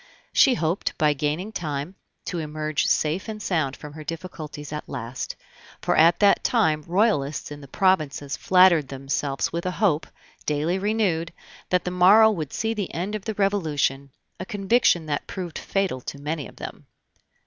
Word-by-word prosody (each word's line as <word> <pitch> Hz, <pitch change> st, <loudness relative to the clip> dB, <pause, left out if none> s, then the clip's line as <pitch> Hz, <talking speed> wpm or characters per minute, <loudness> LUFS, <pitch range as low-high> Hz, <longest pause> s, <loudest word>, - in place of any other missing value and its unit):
She 265 Hz, -3 st, +5 dB
hoped, 170 Hz, -1 st, -1 dB
by 150 Hz, -1 st, +3 dB
gaining 150 Hz, +8 st, -2 dB
time, 150 Hz, -3 st, -4 dB, 0.3 s
to 175 Hz, -, -3 dB
emerge 155 Hz, -1 st, -2 dB
safe 160 Hz, +7 st, +1 dB
and 215 Hz, -1 st, -5 dB
sound 160 Hz, -9 st, -1 dB
from 150 Hz, -1 st, -10 dB
her 155 Hz, 0 st, -9 dB
difficulties 155 Hz, -2 st, -7 dB
at 150 Hz, -, -6 dB
last; 120 Hz, +3 st, -5 dB, 0.4 s
for -, -, 0 dB
at 165 Hz, +2 st, +5 dB
that 200 Hz, -1 st, +5 dB
time 160 Hz, -11 st, +2 dB
Royalists 170 Hz, -, +1 dB
in 145 Hz, 0 st, -8 dB
the 140 Hz, -, -11 dB
provinces 150 Hz, -4 st, +1 dB
flattered 180 Hz, -5 st, +5 dB
themselves 135 Hz, 0 st, -2 dB
with 170 Hz, 0 st, -2 dB
a 180 Hz, -, -3 dB
hope, 175 Hz, -7 st, +2 dB, 0.4 s
daily 155 Hz, +5 st, 0 dB
renewed, 195 Hz, -5 st, 0 dB, 0.4 s
that 180 Hz, 0 st, +2 dB
the 180 Hz, -, -2 dB
morrow 200 Hz, +5 st, +7 dB
would 155 Hz, -9 st, -4 dB
see 225 Hz, 0 st, -1 dB
the 205 Hz, -4 st, -4 dB
end 185 Hz, +5 st, -3 dB
of 215 Hz, -2 st, -4 dB
the 220 Hz, -2 st, -3 dB
Revolution 155 Hz, -9 st, 0 dB, 0.3 s
a -, -, -3 dB
conviction 200 Hz, -4 st, +2 dB
that 145 Hz, -2 st, -3 dB
proved 180 Hz, -4 st, -5 dB
fatal 190 Hz, -10 st, -1 dB
to 140 Hz, -, -7 dB
many 150 Hz, +1 st, -4 dB
of -, -, -15 dB
them. -, -, -9 dB
165 Hz, 170 wpm, -24 LUFS, 150-195 Hz, 0.4 s, morrow